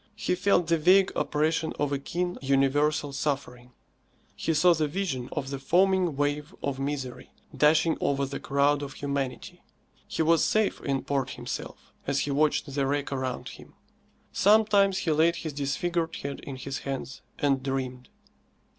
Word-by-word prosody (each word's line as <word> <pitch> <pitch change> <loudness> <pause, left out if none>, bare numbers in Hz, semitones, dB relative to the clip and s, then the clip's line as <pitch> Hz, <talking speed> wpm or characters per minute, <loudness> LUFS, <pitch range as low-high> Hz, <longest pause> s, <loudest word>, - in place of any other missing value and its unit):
He 205 -3 -1
felt 180 -1 +2
the 165 0 +1
vague 185 +4 +5
oppression 160 +1 0
of 145 -1 -1
a 140 - 0
keen, 175 +5 -3
universal 140 +2 +1
suffering. 130 -4 -3 0.6
He 165 - -1
saw 175 +4 +5
the 155 -2 0
vision 145 -7 -3
of 135 -2 -4
the 140 - -4
foaming 180 +2 +2
wave 145 +4 -2
of 140 -1 -2
misery 135 -3 -4 0.3
dashing 160 +2 +3
over 140 0 +1
the 140 +1 -5
crowd 140 +1 +2
of 140 -1 -6
humanity. 140 -3 -4 0.5
He 160 - -1
was 165 +1 +4
safe 215 -1 +1
in 135 -2 -1
port 135 -2 -1
himself, - - -7
as - - +1
he 145 - -2
watched 145 0 +1
the 140 -1 0
wreck 145 0 -1
around 130 -2 -3
him. - - -14 0.6
Sometimes 205 -1 +4
he 165 - 0
laid 160 +3 +3
his 160 -3 -5
disfigured 165 +4 -1
head 140 0 -5
in 135 - -7
his 135 +1 -5
hands 135 -1 -5 0.2
and 140 -2 +1
dreamed. 130 -2 -4
145 Hz, 160 wpm, -27 LUFS, 135-165 Hz, 0.6 s, vague